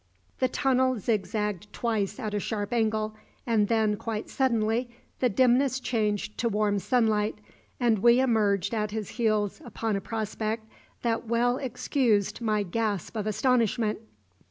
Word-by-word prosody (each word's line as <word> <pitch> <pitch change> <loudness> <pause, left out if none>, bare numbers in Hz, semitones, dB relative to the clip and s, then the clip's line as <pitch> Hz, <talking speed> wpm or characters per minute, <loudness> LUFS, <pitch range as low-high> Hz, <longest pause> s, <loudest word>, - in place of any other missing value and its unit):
The 255 - +3
tunnel 260 -1 +2
zigzagged 210 -1 -2
twice 220 -2 -1
at 215 -4 -3
a 205 - 0
sharp 205 +1 -3
angle, 215 -2 0 0.3
and 220 -3 +2
then, 220 -2 +2
quite 220 -1 -4
suddenly, 235 -2 +1 0.3
the 250 - +3
dimness 255 +4 +3
changed 215 -4 -1
to 235 - +1
warm 205 -1 +1
sunlight, 215 -2 +1 0.4
and 235 -4 +3
we 235 +4 +5
emerged 215 -6 +2
at 215 -2 0
his 215 -1 -4
heels 215 -4 0
upon 225 -2 -2
a 195 - -2
prospect 220 +1 -3 0.4
that 230 0 -1
well 240 +2 +2
excused 245 -5 0
my 215 -2 +1
gasp 205 0 -2
of 215 -1 -2
astonishment. 225 -1 +1
220 Hz, 140 wpm, -27 LUFS, 210-240 Hz, 0.4 s, we